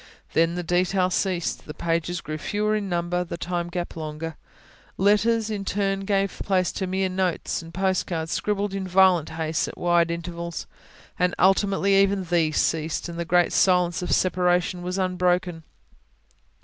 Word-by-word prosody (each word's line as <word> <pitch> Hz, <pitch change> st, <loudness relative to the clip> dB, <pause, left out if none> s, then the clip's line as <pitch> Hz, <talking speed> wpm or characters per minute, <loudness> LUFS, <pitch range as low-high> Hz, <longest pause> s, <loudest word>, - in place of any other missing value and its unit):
Then 165 Hz, +1 st, +2 dB
the 175 Hz, -, -3 dB
detail 180 Hz, +2 st, +1 dB
ceased, 180 Hz, -3 st, -1 dB
the 150 Hz, -, -7 dB
pages 170 Hz, +1 st, -1 dB
grew 155 Hz, +1 st, -5 dB
fewer 210 Hz, +4 st, 0 dB
in 205 Hz, -2 st, -2 dB
number, 175 Hz, 0 st, -1 dB
the 170 Hz, -1 st, -6 dB
time 175 Hz, 0 st, -3 dB
gap 175 Hz, 0 st, -4 dB
longer. 155 Hz, 0 st, -5 dB, 0.6 s
Letters 215 Hz, +3 st, +3 dB
in 205 Hz, -2 st, -3 dB
turn 195 Hz, 0 st, -1 dB
gave 195 Hz, -1 st, 0 dB
place 185 Hz, -2 st, +1 dB
to 190 Hz, -, -3 dB
mere 190 Hz, +1 st, 0 dB
notes 185 Hz, -2 st, -1 dB
and 165 Hz, 0 st, -11 dB
postcards, 175 Hz, -3 st, -1 dB
scribbled 205 Hz, -1 st, -1 dB
in 195 Hz, -1 st, -3 dB
violent 185 Hz, -3 st, +4 dB
haste, 160 Hz, -1 st, -1 dB
at -, -, -8 dB
wide 175 Hz, -1 st, +2 dB
intervals. 170 Hz, 0 st, -5 dB, 0.5 s
And 180 Hz, 0 st, +2 dB
ultimately 195 Hz, +1 st, +3 dB
even 195 Hz, -1 st, +1 dB
these 165 Hz, -3 st, +1 dB
ceased; 160 Hz, +1 st, 0 dB
and 170 Hz, 0 st, -6 dB
the 170 Hz, -, -2 dB
great 175 Hz, 0 st, +3 dB
silence 180 Hz, -2 st, +3 dB
of 180 Hz, -, -3 dB
separation 180 Hz, -1 st, +1 dB
was 180 Hz, +1 st, -3 dB
unbroken. 180 Hz, -2 st, 0 dB
180 Hz, 160 wpm, -24 LUFS, 170-190 Hz, 0.6 s, violent